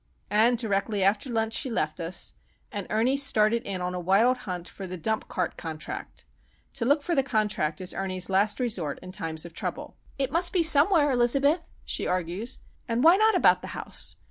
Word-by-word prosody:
And 225 +4 +4
directly 205 -2 -1
after 205 +6 +1
lunch 225 -1 -1
she 265 - 0
left 230 - -2
us, 170 +1 -1 0.4
and 205 -2 -5
Ernie 235 +6 +1
started 230 -4 +3
in 190 -2 -3
on 180 0 -3
a 180 - -3
wild 200 +8 +3
hunt 180 -1 -4
for 195 - -8
"the 185 0 -6
dump 220 +6 -2
cart 180 - -3
contract." 155 -2 -7 0.5
To 230 - -2
look 285 +3 +2
for 345 - -1
the 275 - +3
contract 210 - -1
is 185 -1 -3
Ernie's 185 -1 -2
last 200 +4 +1
resource 190 - -2
in 185 - -9
times 160 -3 -3
of 170 - -10
trouble. - - -5 0.2
"It 270 -1 -1
must 345 +3 +2
be 355 -3 +3
somewhere, 310 -1 +5
Elizabeth," 275 +7 +2 0.2
she - - -2
argues, 185 +7 -3 0.3
"and 235 +1 0
why 335 +3 +7
not 435 +2 +3
about - - +4
the - - -8
house? - - -2
215 Hz, 195 wpm, -26 LUFS, 185-265 Hz, 0.5 s, why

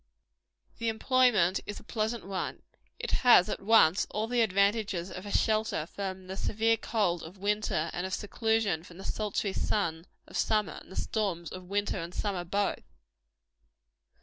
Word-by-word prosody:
The 230 - 0
employment 220 -5 +3
is 205 - -5
a - - -16
pleasant 220 -2 -2
one. 190 -1 -4 0.3
It - - -4
has 235 -6 +7
at - - -3
once 200 -4 +5
all 215 +1 -1
the 240 +1 +1
advantages 200 -3 +1
of 185 +3 -7
a - - -5
shelter 215 -8 +1
from 190 +1 -5
the 190 +1 -6
severe 225 +3 +1
cold 200 -6 0
of 165 +4 -10
the - - -20
winter, 205 -6 0
and 175 - -3
of 190 - -4
seclusion 220 -5 0
from 175 -1 -13
the 190 - -9
sultry 205 -2 -2
sun 170 -6 -1 0.2
of - - -7
summer, 210 -6 +1
and - - -16
the - - -9
storms 185 -7 -2
of 185 -1 -9
winter 205 +1 0
and 170 +1 -6
summer 195 -4 -1
both. 200 +3 -2
200 Hz, 170 wpm, -30 LUFS, 180-220 Hz, 0.3 s, has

